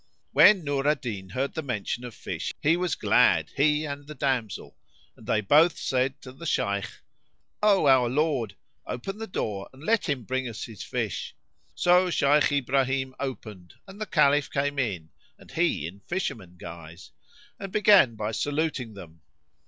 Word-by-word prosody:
When 200 -5 +6
Nur 140 -1 -1
al 150 - +4
Din 105 -9 -6
heard 130 +8 -2
the 160 - -3
mention 120 -3 -3
of 120 -3 -8
fish, - - -4
he 155 +3 +3
was 175 -3 -1
glad, - - +3
he 150 +2 +2
and 145 -1 -6
the 150 - -8
damsel, 125 -7 -2 0.4
and - - -16
they 110 - +2
both 150 - +4
said 130 +1 -1
to 130 - -9
the 160 +6 -8
Shaykh, 100 -7 0 0.7
"O 205 -5 +4
our 130 -3 +5
lord, 135 -5 0 0.3
open 195 - -5
the 225 - -5
door 100 - -4
and 135 +2 -16
let 215 -1 +1
him 135 -4 -1
bring 130 +2 -2
us 110 - -7
his 110 -4 -9
fish." - - -4 0.4
So 180 - +4
Shaykh 145 -2 +3
Ibrahim 130 -1 0
opened 110 -9 -7
and 195 +2 -12
the 215 - -3
Caliph 145 -2 +3
came 145 0 -1
in 95 -11 -2 0.3
(and - - -17
he 75 - 0
in 90 +4 -8
fisherman 100 - -4
guise), 85 0 -11 0.5
and 195 -1 -6
began 200 - +5
by 110 0 -3
saluting 145 -4 -2
them. 85 -4 -12
135 Hz, 170 wpm, -26 LUFS, 110-155 Hz, 0.7 s, When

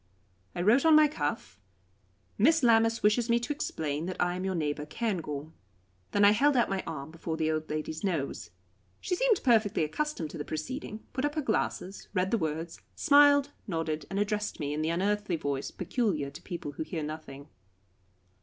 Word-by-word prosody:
I 175 - -1
wrote 235 +8 +5
on 320 -1 +6
my 305 0 +7
cuff: 145 - -4 0.7
"Miss 310 +8 +4
Lammas 225 -1 +4
wishes 225 +3 +3
me 235 0 +4
to 285 +5 -2
explain 155 - -3
that 185 - -5
I 175 0 +1
am 185 - -4
your 190 -1 -1
neighbour, 150 -2 -2
Cairngorm." 160 -8 -3 0.6
Then 205 0 +3
I 205 - +8
held 275 +6 +3
out 235 - +2
my 195 -1 0
arm 155 -2 -6
before 165 0 -4
the 160 0 +1
old 155 0 -3
lady's 155 +1 -4
nose. 150 - -2 0.5
She 360 - -1
seemed 465 0 +2
perfectly 220 - +3
accustomed 165 - -2
to 165 - -8
the - - -2
proceeding, 215 - -5
put 260 - -2
up 290 +1 0
her 310 - 0
glasses, 200 -4 -2
read 185 +1 +1
the 230 - +2
words, 160 +1 -4
smiled, 285 -1 +5 0.2
nodded, 165 -4 -2
and 195 - -3
addressed 210 0 -1
me 145 -1 -2
in 150 - -2
the 155 - 0
unearthly 200 +2 0
voice 140 -3 -3
peculiar 175 - -1
to 155 +5 -11
people 170 -6 -6
who 145 - -4
hear 160 -1 -4
nothing. 150 -2 -7
185 Hz, 185 wpm, -29 LUFS, 155-235 Hz, 0.7 s, I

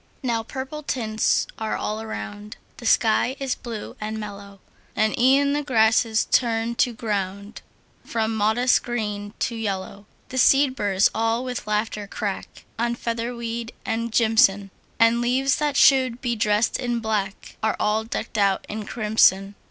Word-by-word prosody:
Now 235 -3 0
purple 265 +5 -6
tints 225 -7 0
are 220 -1 -2
all 215 +1 -3
around; 210 -1 -7 0.2
The 235 - -5
sky 230 +4 +3
is 270 -2 -1
blue 230 -4 -7
and 215 +1 -4
mellow; 200 -1 -9 0.4
And 215 0 +1
e'en 275 +3 +4
the 295 - 0
grasses 225 -4 +2
turn 230 -1 +2
the 245 - +2
ground 200 -2 -4 0.4
From 225 -1 -2
modest 220 +4 +3
green 210 -3 -4
to 235 - -2
yellow. 200 -1 -4 0.2
The 260 - -2
seed 270 +1 +4
burrs 200 -4 +2
all 225 +2 0
with 250 -3 -5
laughter 210 -1 -2
crack 200 -1 -5
On 235 0 0
featherweed 235 0 -4
and 230 +1 -2
jimson; 220 -4 +3 0.3
And 230 +1 +4
leaves 260 +3 +2
that 295 -2 0
should 260 -3 +5
be 240 -2 -1
dressed 210 0 +1
in 240 -2 -1
black 210 -3 -3
Are 220 - +1
all 215 +1 +1
decked 225 -1 -4
out 195 -1 +2
in 215 0 -6
crimson. 210 -3 +2
225 Hz, 150 wpm, -23 LUFS, 210-240 Hz, 0.4 s, should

